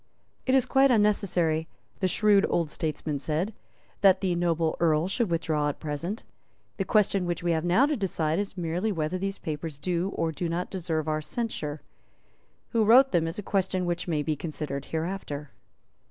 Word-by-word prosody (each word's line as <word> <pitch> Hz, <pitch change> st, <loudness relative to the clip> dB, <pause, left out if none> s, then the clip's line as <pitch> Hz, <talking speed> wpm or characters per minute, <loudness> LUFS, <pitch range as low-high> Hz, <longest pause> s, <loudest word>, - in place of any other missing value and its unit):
"It 260 Hz, -, +4 dB
is 265 Hz, -, +4 dB
quite 270 Hz, 0 st, +4 dB
unnecessary," 190 Hz, -8 st, +2 dB, 0.3 s
the 190 Hz, -, +2 dB
shrewd 205 Hz, +2 st, +4 dB
old 165 Hz, -3 st, 0 dB
statesman 155 Hz, -2 st, -2 dB
said, 160 Hz, +9 st, -1 dB, 0.5 s
"that 190 Hz, -1 st, +6 dB
the 190 Hz, -2 st, 0 dB
noble 170 Hz, -2 st, +1 dB
Earl 160 Hz, 0 st, +3 dB
should 215 Hz, +2 st, 0 dB
withdraw 160 Hz, -3 st, 0 dB
at 145 Hz, -, -5 dB
present. 165 Hz, +7 st, -4 dB, 0.5 s
The 195 Hz, -, -1 dB
question 200 Hz, -3 st, +2 dB
which 175 Hz, -1 st, -2 dB
we 175 Hz, -, +1 dB
have 160 Hz, -1 st, 0 dB
now 180 Hz, +10 st, +4 dB
to 300 Hz, +1 st, 0 dB
decide 170 Hz, -, 0 dB
is 200 Hz, -1 st, -4 dB
merely 175 Hz, +5 st, -1 dB
whether 165 Hz, 0 st, -2 dB
these 195 Hz, +1 st, -2 dB
papers 155 Hz, -1 st, -5 dB
do 175 Hz, +4 st, -1 dB
or 165 Hz, -1 st, 0 dB
do 165 Hz, +3 st, -3 dB
not 175 Hz, +2 st, -3 dB
deserve 165 Hz, -4 st, -2 dB
our 155 Hz, 0 st, 0 dB
censure. 155 Hz, -7 st, -4 dB, 0.9 s
Who 230 Hz, -2 st, +2 dB
wrote 255 Hz, +5 st, +6 dB
them 165 Hz, -3 st, +2 dB
is 165 Hz, -, -4 dB
a 210 Hz, -, -4 dB
question 190 Hz, -2 st, 0 dB
which 175 Hz, 0 st, -2 dB
may 155 Hz, -3 st, 0 dB
be 155 Hz, 0 st, -1 dB
considered 150 Hz, -2 st, -4 dB
hereafter." 160 Hz, -4 st, -4 dB
175 Hz, 180 wpm, -27 LUFS, 155-195 Hz, 0.9 s, that